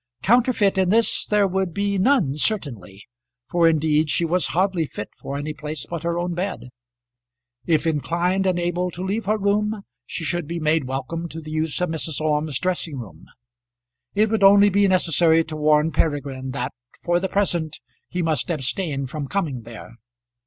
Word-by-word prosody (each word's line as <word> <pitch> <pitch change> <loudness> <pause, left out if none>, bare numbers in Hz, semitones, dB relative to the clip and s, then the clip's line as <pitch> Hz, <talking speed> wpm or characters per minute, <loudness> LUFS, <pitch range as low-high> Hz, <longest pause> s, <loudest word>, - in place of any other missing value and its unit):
Counterfeit 225 -4 +3
in 185 -1 +2
this 225 +3 +3
there 210 -1 +3
would 190 -2 -2
be 200 -1 0
none 195 - +3
certainly, 125 - -2 0.5
for 170 -1 +4
indeed 155 -1 +2
she 170 - +1
was 175 +1 +1
hardly 180 -3 0
fit 105 - -7
for 140 - -5
any 150 +2 -4
place 150 -1 -6
but 170 -2 -5
her 170 0 -1
own 175 0 -2
bed. 175 -7 -4 1.0
If 160 -2 +2
inclined 175 +5 0
and 185 -2 +1
able 175 +1 -1
to 180 +1 -7
leave 200 +3 -2
her 215 +1 +2
room, 210 +1 0 0.2
she - - -5
should 175 0 -2
be 170 +1 -3
made 155 -2 +1
welcome 135 +6 -4
to 160 - -7
the 155 -1 -9
use 155 -1 -1
of 180 - +1
Mrs. 160 -2 -2
Orme's 150 -2 0
dressing 175 -5 -2
room. 115 -6 -10 0.9
It 215 +1 +2
would 220 -2 +1
only 200 +1 +7
be 200 +1 +3
necessary 165 -3 +3
to 160 -1 -7
warn 150 +1 +3
Peregrine 140 -5 -1
that 130 -1 -3 0.3
for 175 0 +2
the 190 +1 -2
present 170 -6 0 0.3
he 180 0 -2
must 160 -1 0
abstain 150 -1 -1
from 140 +2 -5
coming 150 -8 -2
there. 115 0 -11
165 Hz, 175 wpm, -22 LUFS, 150-190 Hz, 1.0 s, only